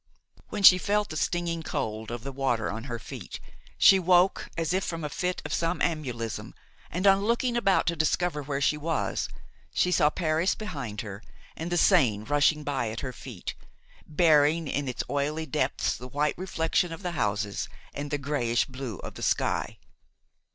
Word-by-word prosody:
When 205 - -4
she 185 -1 +10
felt 210 +2 0
the - - -6
stinging 170 0 -1
cold 110 -7 -3
of 120 -1 -5
the 140 - -5
water 130 -5 0
on 110 +3 -6
her 120 -4 -4
feet, 110 - -8 0.4
she 195 -1 +7
woke 180 +1 +3
as 165 +1 0
if 190 +1 +1
from 165 -2 -4
a 150 - -2
fit 180 +5 -2
of - - -3
somnambulism, 150 -9 -2 0.3
and 180 +4 -2
on 195 0 +6
looking 235 +2 +1
about 195 -5 +3
to 170 - +1
discover 155 0 0
where 140 0 -3
she 150 - +2
was, 160 +2 -1 0.5
saw 180 -4 +3
Paris 160 +2 +1
behind 140 - -5
her 100 -2 -8 0.3
and 165 +2 -5
the 175 - +1
Seine 130 - +4
rushing 145 +3 +2
by 135 -6 -1
at 110 +2 -5
her 130 -2 -4
feet, 120 -9 -7 0.5
bearing 155 0 +4
in 140 0 -2
its 125 - -2
oily 145 +4 -1
depths 135 - 0
the 125 - -8
white 145 +3 0
reflection 175 -1 0
of 165 +4 -8
the 180 - -2
houses 105 - -1 0.2
and 145 +1 -5
the 145 - 0
grayish 130 -5 0
blue 130 -6 -6
of - - -7
the - - -10
sky. - - 0
150 Hz, 175 wpm, -27 LUFS, 130-175 Hz, 0.5 s, she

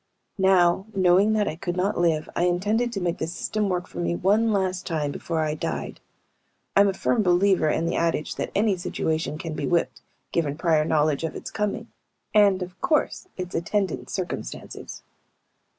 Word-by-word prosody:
Now, 190 0 +4
knowing 190 +3 +4
that 210 -1 +1
I 155 - -2
could 175 +2 -4
not 195 +3 +1
live, 165 -3 +1
I 175 - +2
intended 210 +7 +1
to 205 - -3
make 175 -1 -2
the 160 - -1
system 205 +4 -2
work 180 -1 -1
for - - -9
me 170 0 0
one 215 +6 +2
last 185 -2 -1
time 150 -4 -1
before 160 +3 -2
I 155 -1 0
died. 75 - -4 0.8
I'm 200 0 +6
a 195 - +1
firm 230 - +1
believer 180 -3 +3
in 165 - 0
the 170 - -1
adage 165 -2 0
that - - -2
any 205 -1 +3
situation 160 -3 -2
can 165 -1 -5
be 145 -2 -3
whipped, 130 -8 0 0.3
given 150 -4 -1
prior 160 -2 +2
knowledge 155 -1 +1
of 160 - -3
its - - -7
coming 210 +2 -2 0.4
and, 200 -3 +5
of 180 +1 -11
course, 320 +3 0
its 180 0 -5
attendant 195 +3 -1
circumstances. 180 - -6
180 Hz, 180 wpm, -25 LUFS, 160-200 Hz, 0.8 s, I'm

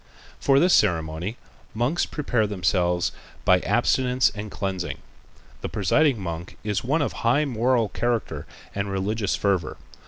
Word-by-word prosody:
For 135 -1 +4
this 180 +3 +4
ceremony 80 +6 +1 0.4
the - - -11
monks 130 +9 +1
prepare 120 -7 0
themselves 90 -2 +1 0.3
by 90 0 +5
abstinence 125 +5 +2
and 105 0 -6
cleansing. 95 -3 -3 0.6
The - - -4
presiding 145 -6 +2
monk 85 -1 -6
is 105 -2 -1
one 145 +5 +1
of - - -2
high 130 +6 +2
moral 120 -2 +1
character 110 -11 -2 0.3
and 100 0 -2
religious 100 +1 -1
fervor. 95 -5 0
105 Hz, 135 wpm, -24 LUFS, 90-125 Hz, 0.6 s, by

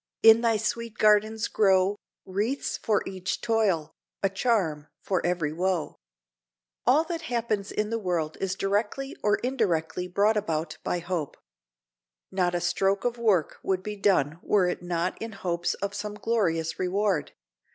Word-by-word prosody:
in 225 0 +8
thy 230 -2 +3
sweet 225 +1 -3
gardens 215 +1 +3
grow 195 -1 +3 0.3
Wreaths 210 +9 -1
for 215 -3 0
each 190 0 -3
toil, 215 -9 +1 0.3
a 195 - +4
charm 190 - 0
for 185 -3 -1
every 170 -4 0
woe." 180 -1 -1 0.9
All 280 +6 +5
that 330 0 -4
happens 220 -4 -1
in 210 +1 -1
the 230 - 0
world 170 -6 -1
is 185 -1 -1
directly 210 +8 -1
or 210 -1 +3
indirectly 180 -9 0
brought 205 +4 +2
about 160 -5 -2
by - - 0
hope. 175 -4 -3 0.9
Not 180 -2 +1
a 175 - 0
stroke 195 +4 +1
of 240 -1 -1
work 200 -9 +2
would 190 -1 -1
be 210 +1 -4
done 170 -6 +2
were 195 -4 +3
it 180 - -2
not 175 0 -2
in 225 0 -5
hopes 175 -3 -1
of 200 +1 -4
some 210 +1 -4
glorious 180 -8 0
reward. 185 -4 0
195 Hz, 150 wpm, -27 LUFS, 175-215 Hz, 0.9 s, in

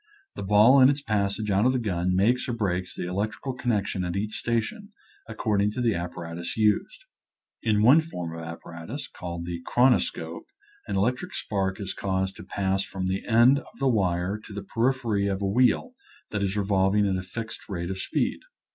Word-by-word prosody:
The - - -7
ball 105 +7 +6
in 130 - +8
its 140 0 -1
passage 105 -1 0
out 100 +5 +3
of 130 - +3
the - - +1
gun 90 -6 0
makes 120 +7 +2
or - - 0
breaks 90 -5 -2
the - - -4
electrical 105 +8 -3
connection 105 -6 -1
at 90 0 -3
each 105 +2 -2
station, 160 - -2 0.4
ac 115 - -6
cording 105 -2 +2
to - - -4
the 120 -3 +2
apparatus 85 0 -5
used. 110 - +1 0.6
In 105 -2 +2
one 135 +8 +7
form 90 - -6
of 85 - -6
apparatus, 85 - -7
called 85 -1 -6
the 85 -1 -5
chron 125 +1 +4
oscope, 80 -6 -3 0.4
an 100 - -2
electric 125 - 0
spark 95 -1 -2
is 100 -2 -4
caused 95 0 -2
to - - -9
pass 95 0 -1
from 95 -2 -5
the 95 +1 -1
end 120 +4 +6
of - - -16
the 135 -1 +2
wire 95 -2 0
to 105 - -11
the 100 0 -5
periphery 115 -2 0
of 95 -1 -1
a 100 - -2
wheel 125 - +2 0.4
that 100 - -2
is 100 +1 -1
revolving 100 0 +2
at 95 - +1
a 95 - -2
fixed 110 +5 -7
rate 85 -2 -3
of 95 - -5
speed. - - -1
100 Hz, 195 wpm, -26 LUFS, 95-120 Hz, 0.6 s, in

